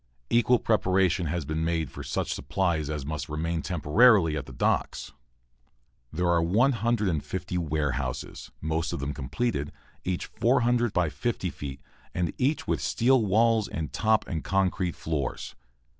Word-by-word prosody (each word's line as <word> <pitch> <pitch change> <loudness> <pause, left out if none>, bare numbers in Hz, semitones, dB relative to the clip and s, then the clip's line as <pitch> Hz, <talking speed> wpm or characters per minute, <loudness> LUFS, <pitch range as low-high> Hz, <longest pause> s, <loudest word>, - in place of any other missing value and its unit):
Equal 120 +1 +4
preparation 95 -6 +2
has 85 -1 -2
been 80 +2 -2
made 80 -3 -1
for - - -8
such - - -2
supplies 85 -6 -1
as 75 -3 -3
must 75 +1 -4
remain 80 +2 -2
temporarily 90 - +4
at 70 -3 -4
the - - -9
docks. 65 - -1 1.0
There 90 +3 -1
are 85 -1 +3
150 105 - 0
warehouses, 75 -5 -3
most 80 +1 -1
of - - -3
them 70 +1 -3
completed, 70 - -2 0.3
each 90 -1 -2
400 120 -1 +2
by 90 -4 +1
50 100 -2 -2
feet, 70 -1 -7 0.3
and 85 -2 -1
each 140 +4 +1
with - - 0
steel 125 0 +3
walls 110 +2 +3
and 80 -2 -5
top 110 0 +2
and 80 -5 -3
concrete 95 0 0
floors. 75 -5 -3
85 Hz, 145 wpm, -27 LUFS, 75-110 Hz, 1.0 s, Equal